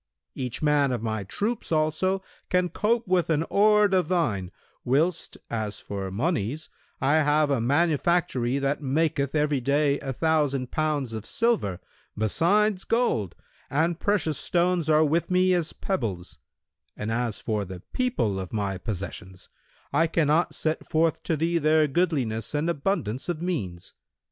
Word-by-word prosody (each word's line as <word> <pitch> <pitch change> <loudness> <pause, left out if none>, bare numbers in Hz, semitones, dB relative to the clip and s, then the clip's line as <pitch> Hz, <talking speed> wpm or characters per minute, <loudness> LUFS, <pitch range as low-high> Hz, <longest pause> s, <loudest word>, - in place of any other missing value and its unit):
Each 130 +2 -4
man 145 -2 +3
of 120 -3 -2
my 110 -2 -2
troops 210 - -3
also 160 +5 +1 0.3
can 180 -1 +2
cope 230 +4 0
with 180 -2 +2
an 155 -2 +2
horde 210 -1 +4
of 180 -4 +2
thine, 125 - 0 0.3
whilst, 155 +7 0
as 110 -3 -3
for 100 -1 -5
monies 140 - -2 0.3
I 140 +4 +3
have 150 -1 +3
a 135 -4 +1
manufactory 145 -1 +1
that 140 +1 -1
maketh 145 0 0
every 150 -3 +1
day 140 +2 +2
a 135 - -4
thousand 145 -3 0
pounds 150 -6 -1
of 110 -2 -5
silver, 205 - 0 0.4
besides 185 - +2
gold, 175 - 0 0.3
and 165 +4 0
precious 195 -7 0
stones 175 -2 +1
are 155 0 +5
with 160 +3 0
me 185 0 +3
as 170 -3 0
pebbles; 95 - -4 0.6
and 105 +2 -3
as 120 -2 -1
for 105 -2 -2
the 95 -2 -8
people 180 - 0
of 95 -2 -6
my 100 -3 -2
possessions 95 -2 -6 0.4
I 165 - +3
cannot 160 0 +1
set 155 0 -2
forth 160 0 +1
to 160 - 0
thee 170 +2 +1
their 155 0 +3
goodliness 135 -8 -1
and 155 +4 +1
abundance 140 - -2
of 170 -3 -2
means. 115 - -4
150 Hz, 150 wpm, -26 LUFS, 115-170 Hz, 0.6 s, are